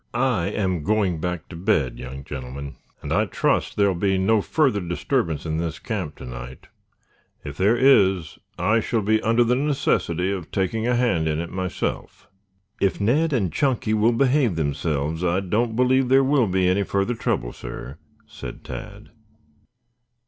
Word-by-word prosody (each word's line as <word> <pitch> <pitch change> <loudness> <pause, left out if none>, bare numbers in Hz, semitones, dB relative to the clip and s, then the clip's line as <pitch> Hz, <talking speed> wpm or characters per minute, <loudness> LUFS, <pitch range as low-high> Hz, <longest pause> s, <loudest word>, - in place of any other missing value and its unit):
"I 120 -8 +1
am 95 -5 -1
going 100 -5 +1
back 90 -2 -3
to 85 - -9
bed, 80 - 0
young 65 +2 -7
gentlemen, 70 +1 -7 0.3
and - - -2
I - - +3
trust - - 0
there 100 -1 +3
will - - +1
be 95 +2 +1
no 105 +3 +3
further 135 -3 +1
disturbance 85 - -1
in 80 0 -2
this 80 -1 -3
camp 95 - -4
to - - -10
night. 60 +1 -9 0.7
If 70 -2 -7
there 100 +8 +3
is 95 - +3 0.2
I 110 +2 +2
shall 110 0 -1
be 110 +2 +2
under 115 +2 +3
the 120 +1 +2
necessity 100 - 0
of 95 -5 -5
taking 110 +4 -1
a 125 - +2
hand 115 -10 +1
in 75 -1 0
it 85 +1 -4
myself." 95 -1 -4 0.5
"If 100 - +1
Ned 145 +11 +2
and 100 - 0
Chunky 120 -1 0
will 110 +2 +3
behave 130 - +2
themselves, 75 +1 -1
I 90 +1 +2
don't 110 +4 -1
believe 125 +1 +3
there 135 +1 +5
will 135 -3 +3
be 95 -1 +1
any 95 +2 +2
further 100 +3 0
trouble, - - -2
sir," 65 +4 -8 0.3
said - - -9
Tad. - - -9
95 Hz, 170 wpm, -23 LUFS, 80-115 Hz, 0.7 s, there